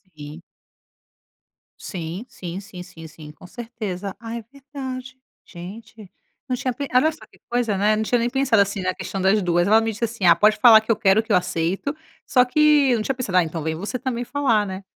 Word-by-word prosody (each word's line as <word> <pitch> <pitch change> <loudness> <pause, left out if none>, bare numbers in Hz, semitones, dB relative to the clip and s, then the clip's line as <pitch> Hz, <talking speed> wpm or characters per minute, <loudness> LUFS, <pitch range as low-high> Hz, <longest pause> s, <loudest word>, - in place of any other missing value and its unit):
Sim. 150 +2 -10 1.4
Sim, 180 +3 -6
sim, 180 -3 -7
sim, 190 -3 -10
sim, 165 -3 -12
sim, 155 -1 -12
com 155 +4 -15
certeza. 205 -4 -6
Ah, 230 0 -7
é - - -6
verdade, 260 -2 -8 0.3
gente, 210 +3 -11 0.4
não 255 - -1
tinha 250 0 -2
pe 280 +2 -5
olha 280 +6 +4
só 310 - -14
que - - -25
coisa, 240 -4 0
né. 210 +2 +2
Não 220 - -1
tinha 240 +2 +1
nem 235 - 0
pensado 260 -5 +2
assim 200 0 -1
na 185 0 -1
questão 195 0 -5
das 195 +3 +3
2. 175 -1 +1
Ela 220 +2 +5
me 225 - -1
disse 215 +2 -7
assim: 225 -4 -4
"Ah, 170 -1 +7
pode 215 +4 +3
falar 220 -1 +8
que 220 - -2
eu 225 - +3
quero, 215 0 +3
que 225 - -7
eu - - +5
aceito". 180 - -2 0.3
Só 250 -1 +3
que 295 0 +4
eu 240 - +3
não - - -2
tinha 270 - -2
pensado: 205 -8 -1
"Ah, 180 - +5
então 160 -1 -5
vem 160 0 -2
você 205 +9 -4
também 245 -1 -3
falar, 245 -5 +1
né". 190 0 -7
215 Hz, 220 wpm, -22 LUFS, 185-245 Hz, 1.4 s, falar